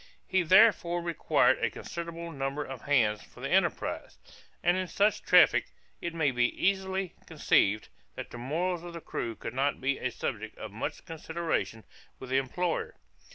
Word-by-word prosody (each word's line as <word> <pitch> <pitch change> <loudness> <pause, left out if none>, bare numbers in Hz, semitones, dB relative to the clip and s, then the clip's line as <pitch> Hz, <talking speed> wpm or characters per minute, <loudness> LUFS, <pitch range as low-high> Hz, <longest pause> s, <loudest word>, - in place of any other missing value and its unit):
He 190 -1 +2
therefore 175 -1 +5
required 170 -2 +2
a - - +3
considerable 170 0 -6
number 140 0 -3
of 135 -3 -8
hands 115 -7 +2
for - - -17
the - - -4
enterprise; - - 0 0.5
and 175 +1 +4
in 185 0 -1
such 205 +4 +2
a - - -28
traffic, - - +5 0.3
it 170 -1 -4
may 155 -4 +2
be 120 -1 +2
easily 190 -1 0
conceived, 105 +2 +2 0.3
that - - -7
the 120 - -8
morals 165 +7 -1
of 175 0 -9
the 170 - -6
crew 115 -6 -4
could 115 - -7
not 140 +2 0
be 135 +1 0
a 125 - -1
subject 110 -4 -5
of 110 - -7
much 110 +4 -5
consideration 160 -8 -3 0.3
with 130 -1 -9
the 130 - +3
employer. 165 +6 -2
160 Hz, 170 wpm, -29 LUFS, 130-175 Hz, 0.5 s, therefore